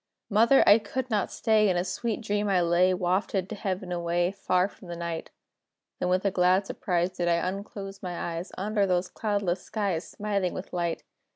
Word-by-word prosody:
Mother! 230 +6 +6
I 205 +2 +8
could 255 +2 -4
not 205 -3 0
stay; 215 -2 +3
In 180 - +1
a 175 - +1
sweet 220 +5 -3
dream 205 -1 -1
I 190 -2 +3
lay, 175 +2 +3
Wafted 185 +1 0
to 220 - -4
Heaven 190 -2 -3
away, 175 +1 0
Far 185 -2 +1
from 195 - -15
the 175 - -5
night; 170 -1 -4 0.7
Then, 180 - 0
with 185 +2 +1
a 200 - +3
glad 185 +2 +3
surprise, 180 -2 -1
Did 180 -1 -2
I 170 +1 +2
unclose 195 0 -6
my 180 -2 -5
eyes, 170 +3 -5
Under 205 +1 +1
those 180 0 +1
cloudless 200 -4 -1
skies, 195 -6 -2
Smiling 200 -3 -2
with 185 - -7
light! 170 -2 -2
185 Hz, 190 wpm, -27 LUFS, 175-205 Hz, 0.7 s, I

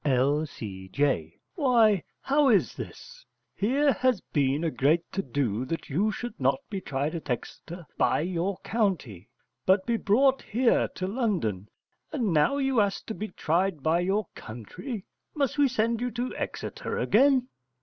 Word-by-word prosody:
L.C.J. 125 - 0 0.2
Why, 230 - +4 0.2
how 280 0 +3
is 210 -6 +3
this? - - -9 0.3
Here 275 +7 +2
has 255 -3 +2
been 145 +1 +2
a 165 - 0
great 145 +7 +2
to 195 - -1
do 125 - -1
that 165 +2 -5
you 200 +10 +2
should 240 +1 -6
not - - +3
be 195 -2 -3
tried 145 -1 -2
at 165 -4 -6
Exeter 170 +7 -5
by - - +3
your 180 +3 -1
country, 170 - -1 0.3
but 190 0 +3
be 235 -1 +1
brought 260 +6 +3
here 235 +2 +2
to 185 - -3
London, 185 - -1 0.4
and 230 - 0
now 160 - +3
you 270 -4 +2
ask 200 -1 -1
to 220 - -4
be 215 0 -4
tried 175 -3 0
by 165 +2 +3
your 195 +4 0
country. 155 - -7 0.3
Must 290 -1 0
we 285 - +6
send 230 -2 0
you 250 - 0
to 245 +2 -4
Exeter - - -4
again? 260 +2 +3
195 Hz, 155 wpm, -27 LUFS, 145-240 Hz, 0.4 s, we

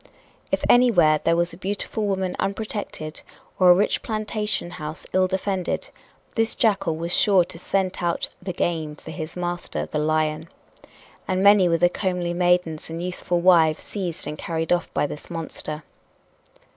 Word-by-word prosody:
If - - 0
anywhere 180 -12 +5
there 165 - +3
was 170 +1 0
a - - -10
beautiful 205 +2 -3
woman 190 -2 -1
unprotected, 195 -6 -4 0.4
or 185 -1 +6
a 175 - +9
rich 200 +3 +1
plantation 215 -4 -2
house 155 0 -7
ill 185 0 +4
defended, 190 - -2 0.4
this 225 -2 +1
jackal 195 -7 +1
was 170 +2 -2
sure 195 -4 +5
to 165 - -9
scent 185 0 -1
out 170 -1 0
"the 185 0 -4
game" 160 -3 -2
for 160 - -10
his 160 -1 -6
master, 175 -1 -3
the 150 - -3
lion. 155 +1 0 0.8
And 185 0 0
many 200 -3 +6
were 165 - +3
the 175 +2 +5
comely 180 -1 -2
maidens 175 -3 +1
and 165 +1 -5
youthful 180 0 -2
wives 165 -3 +5
seized 180 -5 -4
and 150 - -6
carried 165 0 -1
off 175 - -1
by - - +1
this 145 - -7
monster. 160 -2 -6
175 Hz, 160 wpm, -24 LUFS, 165-195 Hz, 0.8 s, a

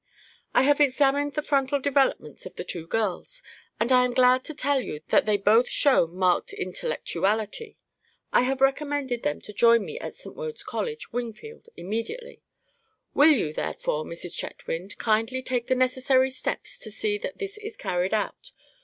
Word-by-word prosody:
"I - - +6
have 290 +2 +3
examined 285 +1 +3
the 300 - -2
frontal 280 -1 +1
developments 275 0 0
of - - -13
the - - -5
two 165 -2 -5
girls, 225 - -2 0.4
and 235 +3 0
I 250 -1 +6
am 250 -1 -1
glad 255 0 +5
to 310 - -4
tell 280 0 +1
you 150 -10 -6
that - - +3
they 210 -1 +3
both 220 +5 +4
show 265 - +4
marked 180 +1 0
intellectuality. 205 - -2 0.6
I - - +6
have 265 +1 -1
recommended 270 -2 +1
them 145 - -2
to 210 - -10
join 230 0 +5
me 475 - -6
at - - -7
St. - - -10
Wode's 470 -2 -6
College, 455 - -5
Wingfield, 245 - -6
immediately. 230 - -5 0.7
Will 290 +3 +7
you, 210 - +3
therefore, 155 0 -2
Mrs. 170 +1 -4
Chetwynd, 180 +5 -5
kindly 225 +4 0
take 245 -2 -1
the 260 - +2
necessary 260 +1 +2
steps 260 - -3
to - - -5
see 415 -1 -1
that - - -6
this 405 0 -5
is 430 0 -8
carried 180 +4 -1
out? - - -4
255 Hz, 170 wpm, -26 LUFS, 215-290 Hz, 0.7 s, Will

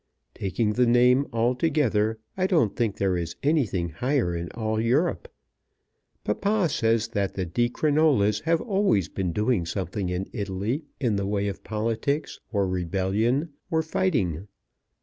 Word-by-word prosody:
Taking 105 +2 -1
the 125 +2 +3
name 125 +3 +4
altogether, 120 -2 +1 0.2
I 185 0 +1
don't 155 - +2
think 115 -4 -1
there 95 -2 +1
is 85 -1 -3
anything 120 - +1
higher 120 - 0
in 85 0 -4
all 110 -1 -1
Europe. 125 - 0 0.9
Papa 200 - +1
says 115 -4 +1
that 100 -4 -2
the 95 - -2
Di 120 +8 0
Crinolas 140 -9 +2
have 165 0 +2
always 195 - +1
been 95 -3 -2
doing 105 +1 +1
something 90 +2 -3
in 90 +2 -2
Italy 100 - -2
in 115 -7 +1
the 100 0 -1
way 100 0 0
of 100 - -5
politics, 115 +8 -2
or 100 -3 +1
rebellion, 100 - 0 0.2
or 160 -1 +1
fighting. 105 - 0
110 Hz, 145 wpm, -26 LUFS, 95-140 Hz, 0.9 s, name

